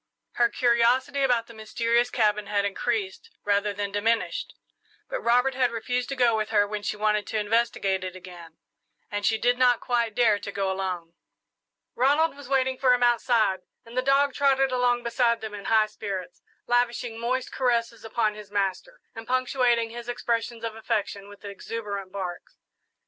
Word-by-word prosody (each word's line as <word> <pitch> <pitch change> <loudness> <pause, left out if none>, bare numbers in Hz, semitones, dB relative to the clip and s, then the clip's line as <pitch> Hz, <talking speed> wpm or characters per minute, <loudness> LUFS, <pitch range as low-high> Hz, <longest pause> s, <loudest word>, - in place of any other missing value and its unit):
Her 240 -1 +2
curiosity 245 +3 +2
about 245 -4 +2
the 230 - -13
mysterious 230 +2 0
cabin 210 -3 +1
had 200 -1 0
increased 205 - -2 0.2
rather 205 0 +1
than 200 0 -4
diminished; 230 - -1 0.5
but - - -4
Robert 250 +3 +3
had 255 -1 +2
refused 245 +2 -2
to 275 - -3
go 245 -3 +3
with 215 -1 -1
her 205 - +3
when 210 0 -4
she 210 - -3
wanted 210 0 +1
to 220 - -2
investigate 210 -3 0
it 185 0 -5
again, 175 -3 -12 0.5
and 205 0 -1
she 220 - +2
did 245 +2 +1
not 245 -2 +4
quite 235 -3 -1
dare 220 -4 +3
to 200 - -6
go 195 -1 -1
alone. 180 -3 -4 0.8
Ronald 290 +5 +2
was 280 -2 -12
waiting 265 -1 +1
for 255 -2 +5
him 245 - -1
outside, 235 -5 +2 0.3
and 230 +1 -12
the 255 - +2
dog 275 +1 +3
trotted 270 -1 +2
along 245 -1 +1
beside 235 -1 +1
them 220 -1 -7
in 205 -1 -8
high 220 -1 +4
spirits, 200 -4 -6 0.2
lavishing 240 -1 0
moist 250 +2 -2
caresses 235 -3 0
upon 225 -1 0
his 210 -1 -11
master, 200 - -2
and 225 -2 -9
punctuating 250 -2 +1
his 240 +1 -8
expressions 235 -1 -2
of 225 -1 -3
affection 205 -2 -3
with 205 0 -14
exuberant 200 -1 -6
barks. 185 -3 -6
230 Hz, 170 wpm, -26 LUFS, 205-245 Hz, 0.8 s, for